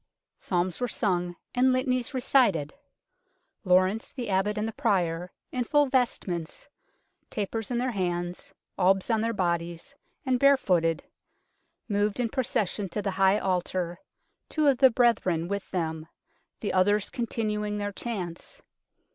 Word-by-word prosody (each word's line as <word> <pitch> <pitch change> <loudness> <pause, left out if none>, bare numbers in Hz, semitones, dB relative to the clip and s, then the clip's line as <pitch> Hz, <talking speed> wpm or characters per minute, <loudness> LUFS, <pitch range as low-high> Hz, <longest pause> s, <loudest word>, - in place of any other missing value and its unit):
Psalms 180 +3 -1
were 245 - +1
sung 180 -5 -1 0.2
and 255 +1 +4
Litanies 255 -1 0
re 255 - -1
cited. 205 - +3 0.9
Lawrence 185 +3 +2
the 245 -6 -5
Abbot 200 +3 +1
and 210 +1 -1
the - - -3
Prior, 175 -3 0 0.2
in 250 - -1
full 290 +4 +3
vestments, 230 - -1 0.6
tapers 215 +1 -3
in 245 - -1
their 250 +1 0
hands, 175 -3 -3 0.3
albs 190 +4 +3
on 220 -1 +2
their 230 +1 0
bodies, 170 +1 -2 0.3
and 255 -2 +1
barefooted, 180 - +3 0.8
moved 205 +1 0
in 240 -2 +1
procession 215 -6 -1
to 210 +4 -3
the 195 - -1
High 190 +1 +3
Altar, 180 -2 -1 0.5
two 310 -1 0
of 270 -3 +4
the 265 -1 +8
brethren 215 -9 +2
with 200 +1 -4
them, 160 -3 -3 0.5
the 210 - -2
others 205 +2 +2
continuing 210 -3 -2
their 205 0 -2
chants. 195 -6 -5
205 Hz, 140 wpm, -27 LUFS, 180-240 Hz, 0.9 s, the